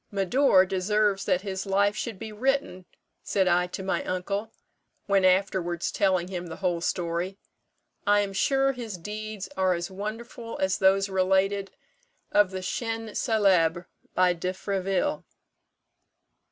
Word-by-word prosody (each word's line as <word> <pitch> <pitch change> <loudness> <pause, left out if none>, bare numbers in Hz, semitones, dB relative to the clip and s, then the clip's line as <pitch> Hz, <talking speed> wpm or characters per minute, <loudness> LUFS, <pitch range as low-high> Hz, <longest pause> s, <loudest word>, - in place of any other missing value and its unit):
'Médor 195 0 +4
deserves 195 +1 +1
that 185 -2 +2
his 195 -1 -4
life 200 +1 +2
should 230 -5 -4
be 220 - -7
written,' 240 -5 -1 0.4
said 190 -2 +1
I 180 0 +3
to 190 - -6
my 190 - -1
uncle, 200 +4 -3 0.5
when 195 -1 +2
afterwards 185 -2 +1
telling 185 -3 +1
him 180 -2 -5
the 165 - -7
whole 175 -2 -1
story; 175 +2 -2 0.7
'I 205 0 +5
am 200 -1 -3
sure 270 +6 +2
his 235 -7 -6
deeds 210 +2 -6
are 185 -1 +2
as 170 +2 -4
wonderful 225 +4 -6
as 190 0 +1
those 195 +1 +4
related 195 +1 +1 0.6
of 205 -2 +4
the 185 -1 -5
'Chiens 225 +2 -3
célèbres' 185 -7 +2 0.3
by 180 -1 +4
De 180 +2 -3
Fréville.' 195 +9 -1
195 Hz, 140 wpm, -27 LUFS, 185-210 Hz, 0.7 s, I